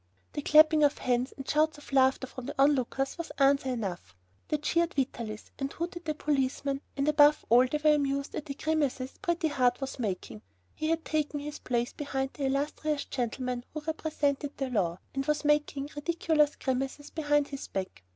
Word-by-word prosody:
The 290 Hz, -, -3 dB
clapping 310 Hz, +1 st, +6 dB
of 290 Hz, 0 st, +3 dB
hands 250 Hz, +1 st, 0 dB
and 270 Hz, -, -8 dB
shouts 310 Hz, +1 st, +2 dB
of 290 Hz, -1 st, -13 dB
laughter 265 Hz, 0 st, +4 dB
from 255 Hz, -1 st, -9 dB
the -, -, -5 dB
onlookers 270 Hz, +1 st, +2 dB
was 335 Hz, -, -5 dB
answer 275 Hz, -1 st, +3 dB
enough. 190 Hz, -, -4 dB, 0.3 s
They 300 Hz, -, 0 dB
cheered 335 Hz, +4 st, 0 dB
Vitalis 235 Hz, -5 st, -3 dB
and 275 Hz, 0 st, -2 dB
hooted 345 Hz, +1 st, -5 dB
the 310 Hz, -1 st, -1 dB
policeman 275 Hz, -1 st, -1 dB, 0.2 s
and, 275 Hz, +1 st, 0 dB
above 300 Hz, 0 st, +5 dB
all, 245 Hz, +3 st, +6 dB
they 300 Hz, -, -1 dB
were 300 Hz, 0 st, +4 dB
amused 280 Hz, -1 st, 0 dB
at 305 Hz, -, -5 dB
the 275 Hz, -, -4 dB
grimaces 285 Hz, -4 st, -1 dB
Pretty 345 Hz, -1 st, 0 dB
Heart 250 Hz, -3 st, +2 dB
was 270 Hz, -1 st, -5 dB
making. 180 Hz, -, -4 dB, 0.3 s
He 310 Hz, -, -2 dB
had 330 Hz, 0 st, 0 dB
taken 300 Hz, -1 st, -1 dB
his 295 Hz, +1 st, -6 dB
place 240 Hz, -1 st, -1 dB
behind 270 Hz, -2 st, -3 dB
the 280 Hz, -, -3 dB
"illustrious 290 Hz, +2 st, -1 dB
gentleman 250 Hz, 0 st, -3 dB
who 305 Hz, -, -3 dB
represented 295 Hz, -2 st, -2 dB
the 270 Hz, -2 st, -2 dB
law," 180 Hz, -7 st, 0 dB, 0.2 s
and 270 Hz, -, -1 dB
was 300 Hz, 0 st, 0 dB
making 295 Hz, -1 st, +1 dB
ridiculous 305 Hz, -1 st, +1 dB
grimaces 270 Hz, +2 st, -3 dB
behind 295 Hz, -2 st, +1 dB
his 275 Hz, -1 st, -6 dB
back. 190 Hz, -, -5 dB
280 Hz, 180 wpm, -29 LUFS, 260-300 Hz, 0.3 s, clapping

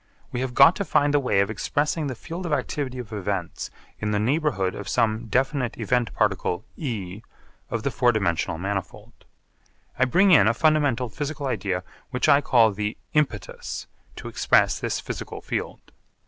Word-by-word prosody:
We 125 Hz, -, -2 dB
have 130 Hz, -2 st, -3 dB
got 140 Hz, +6 st, +8 dB
to -, -, -1 dB
find 145 Hz, -5 st, +2 dB
the 145 Hz, -, +5 dB
way 115 Hz, -8 st, +2 dB
of 100 Hz, +2 st, 0 dB
expressing 150 Hz, +7 st, -1 dB
the 130 Hz, -, -4 dB
field 170 Hz, +9 st, -6 dB
of 155 Hz, -, -1 dB
activity 140 Hz, -3 st, -2 dB
of 120 Hz, -3 st, -7 dB
events 100 Hz, -3 st, -3 dB, 0.3 s
in 105 Hz, -, -2 dB
the 105 Hz, -1 st, +1 dB
neighbourhood 110 Hz, -, +1 dB
of 100 Hz, -, -7 dB
some 115 Hz, -1 st, +1 dB
definite 130 Hz, +1 st, 0 dB
event 120 Hz, +1 st, 0 dB
particle 100 Hz, -2 st, 0 dB
E 105 Hz, -, -5 dB, 0.5 s
of 115 Hz, -2 st, -3 dB
the 140 Hz, -, 0 dB
four 125 Hz, -1 st, +3 dB
dimensional 85 Hz, -7 st, 0 dB
manifold. 95 Hz, +1 st, -4 dB, 0.9 s
I 130 Hz, -, +5 dB
bring 185 Hz, +10 st, +4 dB
in 105 Hz, -, +7 dB
a 115 Hz, -, +3 dB
fundamental 145 Hz, -6 st, +2 dB
physical 145 Hz, +5 st, -4 dB
idea 95 Hz, -8 st, -1 dB, 0.3 s
which 125 Hz, +2 st, 0 dB
I 145 Hz, -1 st, +6 dB
call 115 Hz, -6 st, +4 dB
the 105 Hz, +2 st, -3 dB, 0.2 s
'impetus' 120 Hz, -11 st, -2 dB, 0.3 s
to -, -, -8 dB
express -, -, +2 dB
this -, -, -2 dB
physical -, -, -6 dB
field. -, -, -5 dB
120 Hz, 170 wpm, -24 LUFS, 105-145 Hz, 0.9 s, got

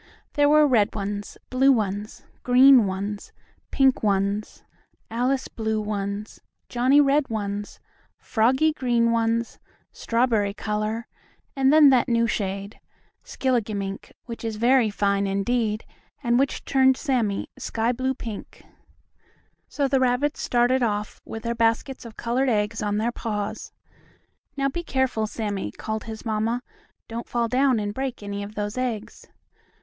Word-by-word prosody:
There 290 Hz, 0 st, +3 dB
were 305 Hz, 0 st, +6 dB
red 225 Hz, -7 st, +2 dB
ones, 205 Hz, 0 st, -4 dB
blue 265 Hz, +2 st, +5 dB
ones, 210 Hz, -3 st, -2 dB, 0.2 s
green 255 Hz, -2 st, +6 dB
ones, 200 Hz, +2 st, -4 dB, 0.4 s
pink 265 Hz, -1 st, +3 dB
ones, 200 Hz, 0 st, -1 dB, 0.5 s
Alice 255 Hz, +3 st, 0 dB
blue 220 Hz, -1 st, -2 dB
ones, 205 Hz, 0 st, -4 dB, 0.3 s
Johnnie 255 Hz, +4 st, +4 dB
red 285 Hz, 0 st, +3 dB
ones, 205 Hz, -2 st, -4 dB, 0.4 s
Froggie 260 Hz, +7 st, +2 dB
green 240 Hz, -4 st, +1 dB
ones, 230 Hz, 0 st, 0 dB, 0.3 s
strawberry 230 Hz, -4 st, 0 dB
color, 215 Hz, +2 st, -2 dB, 0.5 s
and 270 Hz, 0 st, +3 dB
then 300 Hz, -2 st, +7 dB
that 255 Hz, 0 st, +3 dB
new 230 Hz, -1 st, +3 dB
shade, 200 Hz, -2 st, -3 dB, 0.4 s
skilligimink, 210 Hz, -6 st, -2 dB
which 235 Hz, -1 st, -8 dB
is 225 Hz, -1 st, -3 dB
very 240 Hz, +1 st, +3 dB
fine 200 Hz, -1 st, 0 dB
indeed, 215 Hz, +2 st, -1 dB, 0.4 s
and 240 Hz, 0 st, +2 dB
which 275 Hz, 0 st, -1 dB
turned 265 Hz, -1 st, +4 dB
Sammie 240 Hz, -9 st, -1 dB
sky 225 Hz, +1 st, -1 dB
blue 260 Hz, +2 st, -1 dB
pink. 225 Hz, -5 st, -8 dB, 1.0 s
So 285 Hz, -2 st, -1 dB
the 270 Hz, 0 st, +2 dB
rabbits 260 Hz, +3 st, +1 dB
started 245 Hz, +2 st, +2 dB
off 210 Hz, -3 st, -2 dB
with 225 Hz, -, -7 dB
their 235 Hz, 0 st, -1 dB
baskets 230 Hz, +3 st, 0 dB
of 225 Hz, -1 st, -11 dB
colored 250 Hz, +3 st, 0 dB
eggs 210 Hz, 0 st, 0 dB
on 205 Hz, 0 st, -1 dB
their 225 Hz, +3 st, 0 dB
paws. 215 Hz, -2 st, -4 dB, 0.9 s
"Now, 275 Hz, 0 st, +1 dB
be 310 Hz, +6 st, -3 dB
careful, 260 Hz, -7 st, 0 dB
Sammie," 205 Hz, -, -3 dB
called 220 Hz, -, -5 dB
his 220 Hz, 0 st, -8 dB
mamma. 225 Hz, +2 st, -1 dB, 0.4 s
"Don't 230 Hz, +1 st, -6 dB
fall 235 Hz, -1 st, 0 dB
down 255 Hz, 0 st, +2 dB
and 205 Hz, -1 st, -3 dB
break 260 Hz, -2 st, -4 dB
any 200 Hz, 0 st, -4 dB
of 205 Hz, +1 st, -8 dB
those 205 Hz, +3 st, -3 dB
eggs." 230 Hz, -3 st, -4 dB
230 Hz, 140 wpm, -24 LUFS, 210-255 Hz, 1.0 s, then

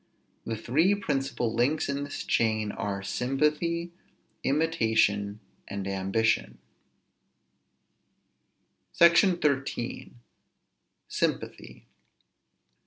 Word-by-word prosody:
The 115 Hz, -, -2 dB
three 155 Hz, -, +2 dB
principal 135 Hz, -, -2 dB
links 140 Hz, +7 st, +1 dB
in 140 Hz, 0 st, -2 dB
this 145 Hz, -, -6 dB
chain 110 Hz, -2 st, +1 dB
are 100 Hz, -1 st, -4 dB
sympathy, 150 Hz, +10 st, 0 dB, 0.5 s
imitation, 110 Hz, -9 st, +1 dB, 0.3 s
and 100 Hz, -1 st, -5 dB
ambition. 100 Hz, +4 st, 0 dB, 2.4 s
SECTION 170 Hz, +2 st, +5 dB
XIII. 140 Hz, -5 st, -2 dB, 0.9 s
SYMPATHY. -, -, -3 dB
130 Hz, 70 wpm, -28 LUFS, 110-155 Hz, 2.4 s, SECTION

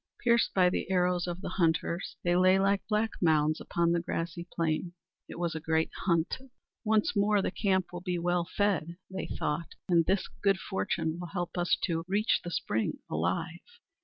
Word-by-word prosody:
Pierced 235 Hz, -1 st, +3 dB
by 185 Hz, -2 st, +5 dB
the 180 Hz, -, -1 dB
arrows 180 Hz, -1 st, +2 dB
of 175 Hz, +1 st, -4 dB
the -, -, -4 dB
hunters, 170 Hz, +2 st, 0 dB
they 175 Hz, 0 st, +2 dB
lay 185 Hz, +1 st, +5 dB
like 195 Hz, +1 st, +2 dB
black 215 Hz, +1 st, +1 dB
mounds 155 Hz, -2 st, +3 dB
upon 170 Hz, 0 st, +1 dB
the 170 Hz, -, +2 dB
glassy 170 Hz, +1 st, -4 dB
plain. 165 Hz, +1 st, -1 dB, 0.4 s
It -, -, -8 dB
was 170 Hz, -1 st, -1 dB
a 160 Hz, -, -3 dB
great 160 Hz, 0 st, 0 dB
hunt! 170 Hz, +1 st, +1 dB, 0.4 s
"Once 215 Hz, -1 st, +2 dB
more 205 Hz, +1 st, +3 dB
the 195 Hz, -, 0 dB
camp 190 Hz, -2 st, 0 dB
will 175 Hz, -, -5 dB
be 180 Hz, -1 st, -2 dB, 0.4 s
fed," 175 Hz, -5 st, +1 dB
they 190 Hz, -, -4 dB
thought, 155 Hz, +3 st, -3 dB
"and 170 Hz, -2 st, +4 dB
this 190 Hz, +2 st, +1 dB
good 195 Hz, -1 st, +3 dB
fortune 170 Hz, -4 st, -2 dB
will 175 Hz, -, -5 dB
help 175 Hz, -1 st, -4 dB
us 175 Hz, -1 st, +2 dB
to 165 Hz, -1 st, 0 dB
reach 205 Hz, +4 st, +2 dB
the 175 Hz, -, -4 dB
spring 110 Hz, -9 st, -1 dB
alive!" 90 Hz, -, -1 dB
175 Hz, 180 wpm, -30 LUFS, 165-190 Hz, 0.4 s, by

